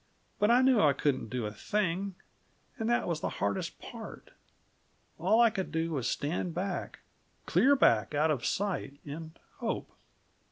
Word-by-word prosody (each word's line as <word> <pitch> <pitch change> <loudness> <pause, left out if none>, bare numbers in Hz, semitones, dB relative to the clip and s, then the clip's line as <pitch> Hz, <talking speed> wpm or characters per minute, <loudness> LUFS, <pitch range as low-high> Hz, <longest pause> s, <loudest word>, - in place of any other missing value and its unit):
But 210 - +3
I 245 +2 +6
knew 260 -3 +5
I 145 -2 +5
couldn't 135 -4 0
do 125 -1 -2
a 105 - -3
thing; 195 - -1 0.6
and 225 +1 -1
that 240 - +2
was 165 -3 -1
the - - -1
hardest 100 -1 -2
part. - - -9 0.9
All 190 +7 +3
I 235 -2 +6
could 190 -3 -3
do 165 +1 -1
was 130 -6 -1
stand 165 +3 -2
back 185 0 -3 0.4
clear 280 +2 +4
back 115 - +3
out 155 +2 +3
of 130 -6 -1
sight, 185 -8 -2
and 160 +2 -7 0.2
hope. - - -3
165 Hz, 160 wpm, -30 LUFS, 145-205 Hz, 0.9 s, I